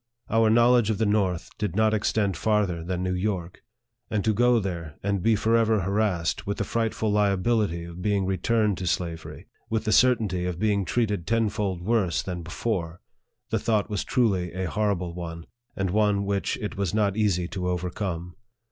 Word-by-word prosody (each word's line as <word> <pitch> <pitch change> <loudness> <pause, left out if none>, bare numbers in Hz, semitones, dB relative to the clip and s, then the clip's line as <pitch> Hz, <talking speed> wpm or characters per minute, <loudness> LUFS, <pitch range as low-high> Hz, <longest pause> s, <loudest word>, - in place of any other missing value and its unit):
Our 115 0 +4
knowledge 120 0 +4
of 110 - 0
the 110 - +1
north 100 -4 0
did 105 -5 -2
not 110 0 +3
extend 105 -2 +1
farther 100 -6 0
than 90 +1 -3
New 90 0 -1
York; 90 -2 -3 0.5
and 105 -3 -1
to 110 - +3
go 120 +3 +4
there, 85 -6 -5
and 100 -1 0
be 115 +2 +3
forever 110 0 +2
harassed 95 -3 0
with 100 - -2
the - - 0
frightful 110 -2 -1
liability 105 -3 +1
of 85 +1 -9
being 100 -1 +1
returned 100 +2 +1
to 90 - -3
slavery 85 -1 -3 0.2
with 110 -1 0
the 110 - +1
certainty 105 -6 +3
of 90 -2 -3
being 100 0 +1
treated 105 -3 -1
tenfold 105 -5 0
worse 95 -6 +1
than 90 -2 -4
before 85 -1 -3 0.5
the - - +1
thought 110 -2 0
was 105 - -1
truly 95 -8 +1
a 95 +1 -2
horrible 95 -3 -1
one, 85 -1 -6 0.3
and 95 -2 -1
one 105 -1 +2
which 100 0 -1
it 105 - -5
was 100 0 -1
not 100 -2 +2
easy 100 -5 +1
to 95 -3 -3
overcome. 90 -1 -3
100 Hz, 175 wpm, -26 LUFS, 90-110 Hz, 0.5 s, Our